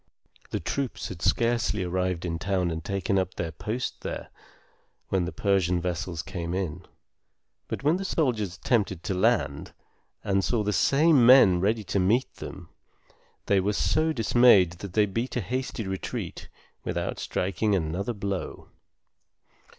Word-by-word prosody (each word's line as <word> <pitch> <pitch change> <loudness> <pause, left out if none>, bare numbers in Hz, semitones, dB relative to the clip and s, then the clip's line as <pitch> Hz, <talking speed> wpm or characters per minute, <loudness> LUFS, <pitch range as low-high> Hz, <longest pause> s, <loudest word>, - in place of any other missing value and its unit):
The - - -2
troops 140 -3 -3
had 90 -3 -8
scarcely 115 -3 +1
arrived 90 -1 -1
in 85 -1 -3
town 95 -3 0
and 80 -1 -4
taken 100 +1 0
up 95 -1 -3
their 85 -2 -3
post 115 +8 -4
there, - - -5 0.8
when 95 -2 +1
the 90 - -4
Persian 95 -3 +1
vessels 85 -2 -3
came 85 +1 -4
in; 95 -5 -3 0.8
but - - -5
when 155 +5 +3
the 195 - -4
soldiers 115 - -1
attempted 95 -2 0
to - - -2
land, 95 - 0 0.5
and 95 -1 +1
saw 115 0 +1
the 105 0 0
same 145 - +4
men 115 -8 +7
ready 110 +3 +1
to 95 +1 -1
meet 110 +8 +2
them, 85 -2 -9 0.8
they 100 - +3
were 100 +3 0
so 155 +9 +1
dismayed 115 - +5
that 100 -2 -7
they 105 0 +4
beat 115 +6 -3
a - - +1
hasty 125 +1 -3
retreat 95 -2 -5 0.3
without - - -3
striking 100 +3 0
another 90 +6 -2
blow. 100 -3 -5
100 Hz, 150 wpm, -27 LUFS, 90-115 Hz, 0.8 s, men